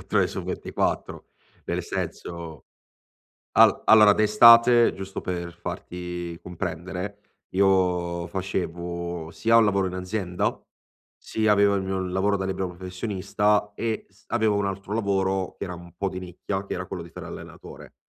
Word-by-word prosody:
24 - - -3
ore - - +4
su - - -5
24. - - -3 0.4
Nel - - -2
senso, 85 -4 -6 0.9
al - - +5
allora 105 -2 +8
d'estate, 115 +3 +7
giusto 95 0 -6
per 85 -1 -4
farti 90 0 -6
comprendere, 90 +3 -5 0.3
io 90 -3 +2
facevo 85 -2 -4
sia 115 +8 +2
un 115 - +7
lavoro 100 -2 +2
in 90 - -4
azienda, 90 -1 -2 0.6
sia 110 -1 +1
avevo 100 0 +4
il 95 - -1
mio 95 0 -2
lavoro 95 +2 0
da 95 - -3
libero 95 -1 -2
professionista 100 +3 -1
e 115 0 -3
s 100 +1 -27
avevo 110 -3 +2
un 100 - 0
altro 95 +1 -5
lavoro, 95 -3 0
che - - -5
era 90 -2 -5
un 85 0 -12
po' 100 - -1
di 90 - -6
nicchia, 95 +2 -5
che - - -4
era 90 0 -4
quello 90 - -6
di 85 - -13
fare - - -9
l'allenatore. - - -11
95 Hz, 155 wpm, -25 LUFS, 90-100 Hz, 0.9 s, allora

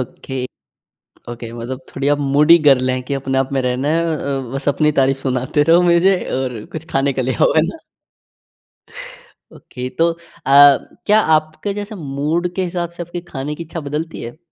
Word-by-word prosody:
Okay. 130 +1 -5 0.8
Okay 120 -1 -7
मतलब 120 +3 -6
थोड़ी 135 +1 -2
आप 145 0 +2
मूडी 145 +4 +5
गर्ल 130 -2 +5
हैं 130 0 -2
कि 140 - -1
अपने 135 -1 -1
आप 135 0 -1
में 135 - +1
रहना 125 +3 -1
है 165 +2 +1
अ, 140 -1 -3
बस 135 +1 -2
अपनी 150 +1 +2
तारीफ़ 135 0 +2
सुनाते 130 +2 0
रहो 170 +3 +5
मुझे 175 +2 +4 0.2
और 125 -5 -4
कुछ 160 0 -6
खाने 135 0 +1
के 130 - -2
लिए 130 0 -1
हो, - - +4
है 155 - +5
ना? 330 - -6 1.8
ओके, 125 0 -7
तो 170 +1 +4
अ, - - -13 0.9
क्या 215 +1 +5 0.2
आपके 155 +6 -3
जैसे 205 +1 -6
मूड 155 +2 -2
के 190 - -1
हिसाब 175 -1 -3
से - - -4
आपकी 175 +1 -6
खाने 145 +2 -4
की 170 - -7
इच्छा 165 +1 -7
बदलती 150 +3 -5
है? 120 +6 -8
145 Hz, 185 wpm, -18 LUFS, 130-165 Hz, 1.8 s, मूडी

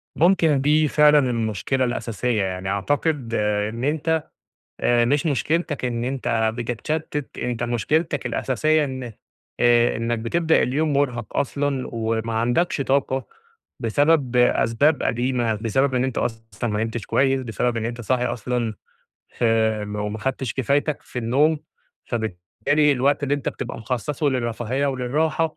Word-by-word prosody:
ممكن 165 -5 +3
دي 150 +2 +3
فعلًا 150 0 +5
المشكلة 115 +3 0
الأساسية، 120 -2 -1
يعني 95 0 -3
أعتقد 130 +4 -1
إن 105 +2 -1
أنت 160 +2 0 0.6
آآ 120 -1 +3
مش 140 +5 +1
مشكلتك 150 0 0
إن 120 -1 -2
أنت 115 -4 0
بتتشتِّت، 140 +5 -3
أنت 120 -1 -2
مشكلتك 145 - 0
الأساسية 155 +3 +1
إن 130 -1 -5 0.6
آآ 120 0 +4
إنّك 115 0 -1
بتبدأ 160 +8 +2
اليوم 150 +4 0
مُرهَق 125 -5 -1
أصلًا 140 -1 -1
وما 115 0 -2
عندكش 120 +9 +1
طاقة 135 -1 0 0.5
بسبب 140 +2 +2
أسباب 125 +4 +3
قديمة، 120 -2 0
بسبب 130 +5 0
إن 125 - +2
أنت 130 -2 -2
أصلًا 115 -1 -3
ما 105 +1 0
نمتش 115 0 -4
كويس، 135 0 +2
بسبب 120 0 -1
أنت 120 +2 -3
صاحي 125 +2 0
أصلًا 120 -1 -2 0.6
فم 110 -2 0
وما 105 +1 -3
خدتش 130 0 -2
كفايتك 140 +3 0
في - - -7
النوم، 140 +7 +2 0.5
فبالتالي 115 +8 0
الوقت 140 +3 +1
اللي 145 0 +1
أنت 145 - -3
بتبقى 125 - -5
مخصّصه 130 +5 -2
للرفاهية 125 +2 -1
وللراحة 150 +5 0
125 Hz, 130 wpm, -23 LUFS, 115-145 Hz, 0.6 s, فعلًا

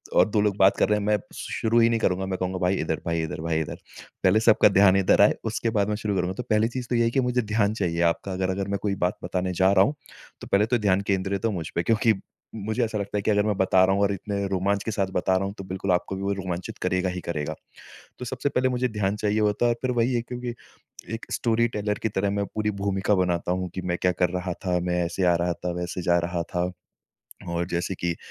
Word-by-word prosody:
और - - +6
2 105 - +1
लोग 105 -1 +1
बात 95 -1 +5
कर - - +3
रहे 105 - +3
हैं 100 - -4
मैं 105 0 +3 0.2
शु - - -7
शुरू 115 +1 +2
ही 115 0 +5
नहीं 115 -1 +1
करूँगा। 95 -2 0
मैं 95 -1 -3
कहूँगा, 95 0 -2
"भाई 90 +1 +2
इधर, 80 -3 -2
भाई 85 -1 0
इधर, 80 0 -5
भाई 80 -1 0
इधर।" 80 - -4 0.5
पहले 95 +4 +5
सबका 110 -1 +5
ध्यान 100 -1 +5
इधर 95 -1 +4
आए, - - +6
उसके 115 - -1
बाद 100 -1 +2
मैं 105 - 0
शुरू 105 -1 -2
करूँगा। 90 0 0
तो 125 - -3
पहली 110 +1 +3
चीज़ 125 0 -5
तो 125 - 0
यही 115 - +3
है 115 - +2
कि 135 - +1
मुझे 125 -1 +1
ध्यान 110 -1 +1
चाहिए 85 -6 -1
आपका 85 +3 +1
अगर, 95 0 -1
अगर 95 +1 -2
मैं 100 0 -1
कोई 100 -2 -1
बात 90 -1 -1
बताने 90 +1 -2
जा 95 +2 +3
रहा 95 -1 +6
हूँ, 145 - -1 0.5
तो - - -8
पहले 100 +2 +3
तो 120 +2 +1
ध्यान 100 -3 +2
केंद्रित 95 +1 -1
हो 115 - +2
मुझ 85 -5 -4
पे। 85 - +1
क्योंकि 115 +2 +3 0.4
मुझे 110 +3 -1
ऐसा 110 -1 -3
लगता 100 0 -3
है - - 0
कि 110 - +1
अगर 105 0 +3
मैं 105 - +1
बता 95 -1 +4
रहा 95 +1 +2
हूँ 100 - 0
और 100 - +2
इतने 100 +1 -3
रोमांच 100 +1 0
के 115 - -3
साथ 100 -3 0
बता 95 +1 +1
रहा 95 +1 +1
हूँ, 100 - -4
तो 95 - -6
बिल्कुल 95 0 -3
आपको 90 +2 0
भी 95 - -5
वो 100 +1 0
रोमांचित 90 -2 -5
करेगा 90 0 0
ही 90 - -4
करेगा। 80 -2 -3 0.6
तो - - -5
सबसे 125 +3 -2
पहले 130 -2 +1
मुझे 125 0 0
ध्यान 105 -3 -1
चाहिए 105 0 0
होता 105 +2 +1
है 120 - +3
और - - -4
फिर 130 - 0
वही 120 +2 +1
है, 120 - +1
क्योंकि 125 0 -5 0.6
एक 115 - -7
स्टोरी 115 0 +1
टेलर 105 0 -1
की 110 - +1
तरह 100 -1 -1
मैं 100 0 -1
पूरी 105 0 0
भूमिका 100 +1 +1
बनाता 90 -2 0
हूँ, 90 0 -2
कि 95 - -3
मैं 90 -1 -2
क्या 90 - +3
कर 90 0 +1
रहा 90 0 -3
था, 90 0 -1
मैं 90 0 0
ऐसे 85 +3 -2
आ 85 - +5
रहा 90 - +1
था, 90 +1 -4
वैसे 90 +1 -4
जा 85 - +5
रहा 85 -1 -2
था। 90 +1 0 0.8
और 85 0 -1
जैसे 90 +2 -2
कि 85 -1 -2
अ, - - -10
100 Hz, 275 wpm, -25 LUFS, 90-105 Hz, 0.8 s, और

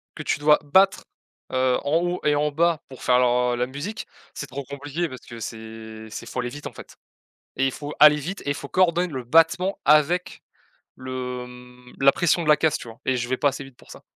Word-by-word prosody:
que 150 - -7
tu - - 0
dois 150 0 +4
battre, 190 +6 +3 0.5
heu, 130 -1 +2
en 145 +2 +1
haut 175 +1 -1
et 150 -1 +3
en 150 +1 +1
bas 165 +1 +1
pour 130 - -12
faire 125 0 +4
leur 125 0 +2
heu, - - 0
la 125 +1 -1
musique. 145 +12 -6 0.3
C'est - - -6
trop 140 +1 -7
compliqué 145 +5 -4
parce 130 -4 -10
que 115 - -10
c'est 110 0 -8
c'est - - -7
faut 125 - -4
aller 125 - -3
vite 145 +4 -8
en - - -10
fait - - -13 0.6
et 135 - +2
il 135 - 0
faut 145 0 -7
aller 150 0 +9
vite 165 +7 -5
et - - -2
il - - -2
faut 140 - -8
coordonner 180 0 +2
le 130 -3 -5
battement 165 +7 +3
avec 155 +5 +2 0.6
le, 130 -1 -5
hem, 125 0 -14
la 140 0 +7
pression 175 0 +1
de 155 - -4
la 150 - +7
caisse, 155 -1 +2
tu - - -9
vois? 115 +2 -13
Et 130 - +2
je 120 0 -3
vais 130 - +1
pas 145 - +3
assez 140 0 -4
vite 135 -2 -15
pour - - -18
ça. - - -12
140 Hz, 240 wpm, -24 LUFS, 125-155 Hz, 0.6 s, aller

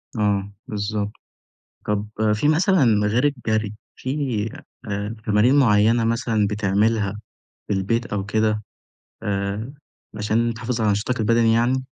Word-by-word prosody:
آه، 100 -2 0 0.2
بالضبط، 105 0 -2 0.7
طب 105 0 -1 0.3
في 105 +7 +1
مثلًا 150 - +3
غير 120 +6 +2
الجري، 110 -7 0 0.2
في 130 - -6 0.8
آآ 105 +2 -3
تمارين 105 +6 +4
معينة 115 -1 +4
مثلًا 115 -2 +1
بتعملها 105 0 0 0.5
في - - 0
البيت 115 +5 0
أو 100 -2 -3
كده؟ 110 0 0 0.6
آآ، 100 +5 -2 0.4
عشان 115 +3 +1
تحافظ 115 +1 -3
على 105 -2 +3
نشاطك 110 +5 -1
البدني 115 +1 +3
يعني؟ 125 +3 +2
110 Hz, 120 wpm, -22 LUFS, 105-115 Hz, 0.8 s, تمارين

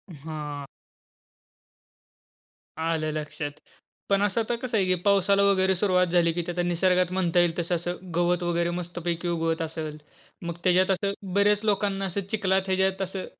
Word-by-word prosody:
हां. 150 -1 -6 2.1
आलं 160 -1 -1
लक्षात. 150 -1 -4 0.6
पण 200 0 +3
असं 205 +2 +1
आता 235 +2 -1
कसं 235 -1 -2
आहे 195 - +2
की 185 0 +2
पावसाला 200 0 +4
वगैरे 190 -1 +3
सुरुवात 180 -1 +2
झाली 170 -1 +3
की 175 - -1
ते - - -1
आता 175 0 -1
निसर्गात 180 +1 +2
म्हणता 180 -2 +1
येईल 175 -1 +2
तसं 175 +1 0
असं 175 +1 -3 0.2
गवत 175 0 +2
वगैरे 170 0 0
मस्तपैकी 175 0 -4
उगवत 165 -1 0
असेल. 155 -1 -4 0.4
मग 170 -1 -5
त्याच्यात 185 +1 +4
असं 195 +1 0 0.2
बऱ्याच 205 +1 +3
लोकांना 200 -1 +1
असं 195 +1 -2
चिखलात, 195 -3 +2
ह्याच्यात 190 0 +1
असं 190 0 -3
180 Hz, 155 wpm, -26 LUFS, 170-195 Hz, 2.1 s, पावसाला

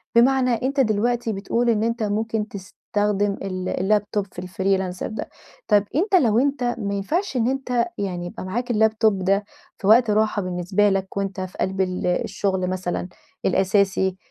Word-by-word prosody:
بمعنى 255 +2 +4
أنت 275 +2 0
دلوقتي 235 0 +1
بتقول 230 +5 0
إن 220 -2 +2
أنت 230 0 -1
ممكن 215 +1 -1
تستخدم 205 +1 -2
ال 185 -1 -3 0.2
الLaptop 205 0 -3
في 180 +1 -6
Freelancer 190 -1 -1
ده. 220 - -6 0.4
طب 205 -1 +4
أنت 380 +6 +2
لو 235 - +4
أنت 275 0 0 0.2
ما 200 -2 -2
ينفعش 300 - -1
إن 230 0 +2
أنت 255 0 0
يعني 180 -3 -3
يبقى 175 - -7
معاك 240 +6 -2
الLaptop 220 +1 +3
ده 195 +1 0 0.3
في 195 - -4
وقت 230 +1 +6
راحة 210 0 +2
بالنسبة 185 +3 +1
لك، 195 0 -2
وأنت 195 -1 -2
في 185 -1 -7
قلب 190 0 -1
ال 185 -1 -1
الشغل 185 +1 0
مثلًا 180 -1 -3 0.4
الأساسي، 190 0 +2
205 Hz, 160 wpm, -23 LUFS, 190-230 Hz, 0.4 s, وقت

